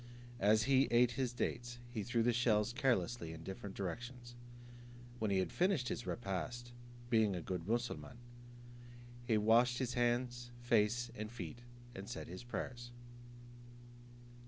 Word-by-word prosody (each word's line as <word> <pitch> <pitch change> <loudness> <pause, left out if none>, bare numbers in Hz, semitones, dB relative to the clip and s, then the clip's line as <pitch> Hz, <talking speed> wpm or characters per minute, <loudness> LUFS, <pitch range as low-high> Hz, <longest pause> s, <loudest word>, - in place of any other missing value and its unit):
As 110 +1 +5
he 135 +2 +4
ate 120 +1 +5
his 125 0 -1
dates, 120 0 -3
he 115 -3 -2
threw 115 +2 +1
the 120 +1 +3
shells 115 -2 +3
carelessly 120 - +1
in 80 0 -9
different 95 +2 -6
directions. 120 +6 -5 0.9
When 110 - 0
he 100 - +2
had 95 - 0
finished 175 -9 +2
his 120 - -4
repast, 120 +3 -3 0.4
being 110 -4 +4
a - - -2
good 90 -2 -3
Moosulmaun, 120 +2 -2 1.1
he 110 - +4
washed 115 +3 +5
his 125 -1 -1
hands, 120 0 0
face, 120 0 +2
and 110 0 -5
feet, 110 -3 -6 0.3
and 100 +3 -7
said 120 - -5
his 90 +7 -7
prayers. 120 0 -5
120 Hz, 140 wpm, -37 LUFS, 105-120 Hz, 1.1 s, As